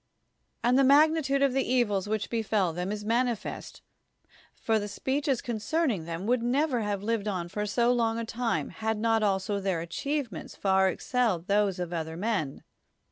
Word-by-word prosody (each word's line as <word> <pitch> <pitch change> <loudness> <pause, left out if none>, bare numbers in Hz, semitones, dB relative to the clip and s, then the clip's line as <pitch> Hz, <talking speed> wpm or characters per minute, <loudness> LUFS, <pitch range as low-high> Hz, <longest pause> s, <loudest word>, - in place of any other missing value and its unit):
And 250 +2 +4
the - - +5
magnitude 280 0 +4
of 275 -2 +3
the 270 0 +2
evils 210 -6 +1
which 215 -1 -2
befel 215 -6 0
them 180 +3 -3
is 210 0 -5
manifest, 235 0 -2 0.7
for 220 -1 0
the 205 - -4
speeches 265 +5 -1
concern 255 +7 0
ing 175 -7 -4
them 170 +3 -5
would 245 +1 +2
never 255 +2 +1
have 205 -2 -2
lived 220 -1 -1
on 180 -4 -2
for 210 +4 -3
so 235 +4 +2
long 230 -2 +1
a 230 - -3
time 230 0 -2
had 220 0 -2
not 225 +1 +2
also 200 0 0
their 190 -3 -1
achievements 230 - -4
far 190 -1 +3
ex 185 - -3
celled 225 -10 +1
those 200 -1 +2
of 175 -1 -4
other 160 -1 -4
men. 185 -8 -2
220 Hz, 180 wpm, -28 LUFS, 195-245 Hz, 0.7 s, the